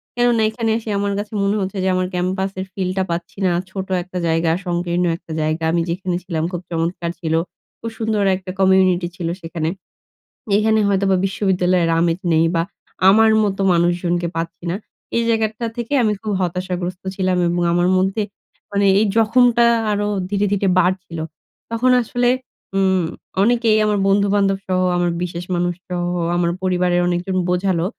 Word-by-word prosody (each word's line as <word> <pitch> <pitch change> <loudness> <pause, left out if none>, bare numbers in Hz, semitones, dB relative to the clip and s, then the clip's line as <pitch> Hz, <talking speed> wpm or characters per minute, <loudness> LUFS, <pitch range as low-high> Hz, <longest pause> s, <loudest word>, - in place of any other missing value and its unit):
কেননা, 240 -2 +2
এখানে 225 0 -2
এসে 225 -1 -7
আমার 200 0 -1
কাছে 210 +1 -6
মনে 200 +1 +1
হচ্ছে 190 +1 -4
যে, - - +1
আমার 185 0 0
ক্যাম্পাসের 185 +1 -2
ফিলটা 190 0 -1
পাচ্ছি 170 +3 -4
না। 180 - +3 0.2
ছোট 190 -1 -5 0.2
একটা 185 0 -8
জায়গা, 165 0 +2
সংকীর্ণ 175 0 0
একটা 170 - -13
জায়গা। 155 +1 -1
আমি 170 - +1
যেখানে 180 +1 -2
ছিলাম, 165 -3 -2
খুব 175 -1 -4
চমৎকার 170 +1 -2
ছিল। 160 -2 -2 0.5
খুব 230 - -5
সুন্দর 220 -2 0
একটা 185 0 -7
কমিউনিটি 185 -2 +3
ছিল 175 -3 -4
সেখানে। 165 -1 -3 0.9
এখানে 220 +1 +3
হয়তোবা 195 -1 +2
বিশ্ববিদ্যালয়ের 185 -3 +1
আমেজ 170 +1 +1
নেই 160 +1 +4
বা 165 - +3 0.5
আমার 220 +2 +5
মতো 195 -1 -1
মানুষজনকে 175 0 +1
পাচ্ছি 165 +1 -5
না। - - -1 0.4
এই 235 - +2
জায়গাটা 220 0 0
থেকে 240 +3 -3
আমি 215 -2 +2
খুব 215 - -3
হতাশাগ্রস্ত 180 0 -3
ছিলাম 185 -1 0
এবং 175 +1 0
আমার 175 +1 +2
মধ্যে 190 +3 +1 0.5
মানে 200 0 +1
এই 220 - +3
জখমটা 235 +1 +4 0.3
আরও 205 0 0 0.2
ধীরে, 205 0 +1
ধীরে 200 -1 +1
বাড়ছিল। 180 -2 -1 0.5
তখন 250 +3 +2
আসলে 245 +1 0 0.5
উম 190 -2 +2 0.4
অনেকেই 230 0 +3
আমার 210 -1 +1
বন্ধু-বান্ধবসহ, 195 -1 +1 0.2
আমার 175 -1 +1
বিশেষ 175 0 -5
মানুষসহ, 175 0 -2 0.3
আমার 175 -1 +1
পরিবারের 180 -1 +1
অনেকজন 180 +2 -1
বোঝালো 180 -1 +1
185 Hz, 155 wpm, -20 LUFS, 175-205 Hz, 0.9 s, আমার